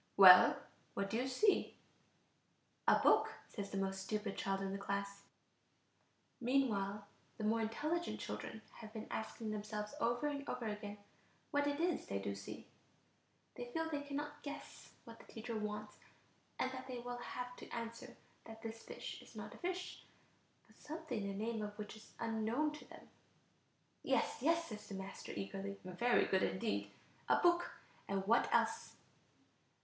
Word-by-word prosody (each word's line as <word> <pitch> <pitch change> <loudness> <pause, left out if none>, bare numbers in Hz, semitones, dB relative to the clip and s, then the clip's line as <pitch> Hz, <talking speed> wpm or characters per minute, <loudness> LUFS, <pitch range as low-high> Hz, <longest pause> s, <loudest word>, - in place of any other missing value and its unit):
"Well, 185 -2 +11 0.4
what 195 0 -1
do 225 - +2
you 255 +2 +1
see?" 385 +11 +3 1.1
"A - - +8
book," - - +5
says 200 -2 -4
the 195 - -3
most 195 0 0
stupid 210 +1 -2
child 195 0 0
in 195 0 -1
the 200 - -3
class. 200 0 -2 1.2
Meanwhile, 215 -6 +2 0.3
the 220 - -4
more 225 +2 +3
intelligent 305 +10 -1
children 220 - -5
have 220 -2 -8
been 220 -1 -4
asking 220 0 -3
themselves 210 +1 -3
over 240 0 +2
and 285 -1 -1
over 240 - -2
again 210 -1 -3 0.5
what 285 0 +3
it 285 +1 0
is 345 -2 +1
they 100 - -1
do 100 0 -2
see; 100 0 -7 0.9
they 245 - -5
feel 325 +3 -1
they 290 -2 0
cannot 290 +1 -4
guess 290 0 -7
what 230 0 -10
the - - -14
teacher 230 +1 -4
wants, 210 0 -3 0.6
and 260 - +1
that 260 0 -6
they 255 -1 -4
will 245 0 -4
have 250 +1 -5
to - - -9
answer 230 +1 -5 0.3
that 225 0 -10
this 225 0 -5
fish - - -6
is - - -15
not - - -6
a - - -11
fish, 360 0 -3 0.6
but - - -22
something 300 -7 -4
the 200 - -2
name 230 -1 -1
of 210 0 -4
which 210 0 -5
is 215 - -14
unknown 230 +6 +1
to 300 - -9
them. - - -13 0.9
"Yes, - - +1
yes," 330 +4 +4
says 215 -7 -7
the 200 - -4
master, 190 0 -6
eagerly, 195 0 -4
"very 190 +7 +3
good 190 -1 +3
indeed, 100 +1 0 0.4
a - - +7
book. 345 0 +4 0.4
And 195 -1 0
what 230 +4 +4
else?" - - +2
225 Hz, 165 wpm, -38 LUFS, 200-265 Hz, 1.2 s, Well